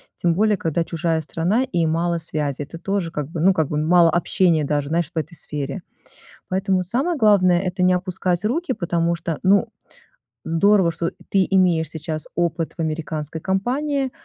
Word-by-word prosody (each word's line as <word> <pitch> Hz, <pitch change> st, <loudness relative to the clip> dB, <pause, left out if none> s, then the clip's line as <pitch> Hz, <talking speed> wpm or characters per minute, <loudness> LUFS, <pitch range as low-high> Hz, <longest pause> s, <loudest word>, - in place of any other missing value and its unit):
тем 170 Hz, -1 st, +1 dB
более 210 Hz, +3 st, +2 dB
когда 165 Hz, -2 st, -1 dB
чужая 165 Hz, -1 st, -1 dB
страна 175 Hz, -, 0 dB
и 175 Hz, -10 st, 0 dB
мало 170 Hz, +2 st, 0 dB
связи. 150 Hz, -3 st, -2 dB
Это 145 Hz, +3 st, -7 dB
тоже, 185 Hz, -1 st, -2 dB
как 150 Hz, -4 st, -4 dB
бы 165 Hz, -1 st, -4 dB
ну, 190 Hz, +3 st, +5 dB
как 160 Hz, -4 st, 0 dB
бы, 150 Hz, -, -3 dB
мало 165 Hz, +2 st, +4 dB
общения 170 Hz, -1 st, +2 dB
даже, 145 Hz, -1 st, -1 dB
знаешь, 165 Hz, +1 st, -1 dB
в -, -, -9 dB
этой 160 Hz, +2 st, -3 dB
сфере. 150 Hz, +2 st, -5 dB, 0.7 s
Поэтому 190 Hz, 0 st, +1 dB
самое 270 Hz, -, -1 dB
главное- 190 Hz, -7 st, +4 dB
это 180 Hz, 0 st, -2 dB
не 185 Hz, -, +4 dB
опускать 180 Hz, 0 st, -1 dB
руки, 270 Hz, +4 st, 0 dB
потому 170 Hz, -2 st, 0 dB
что, 165 Hz, -1 st, -4 dB
ну, 195 Hz, +2 st, +4 dB, 0.8 s
здорово, 180 Hz, +2 st, +3 dB
что 165 Hz, +1 st, -3 dB, 0.2 s
ты 195 Hz, -2 st, +3 dB
имеешь 180 Hz, -5 st, +2 dB
сейчас 155 Hz, -1 st, -4 dB
опыт 170 Hz, -1 st, -1 dB
в -, -, -3 dB
американской 155 Hz, -1 st, -4 dB
компании, 260 Hz, -, -1 dB
170 Hz, 175 wpm, -21 LUFS, 160-190 Hz, 0.8 s, ну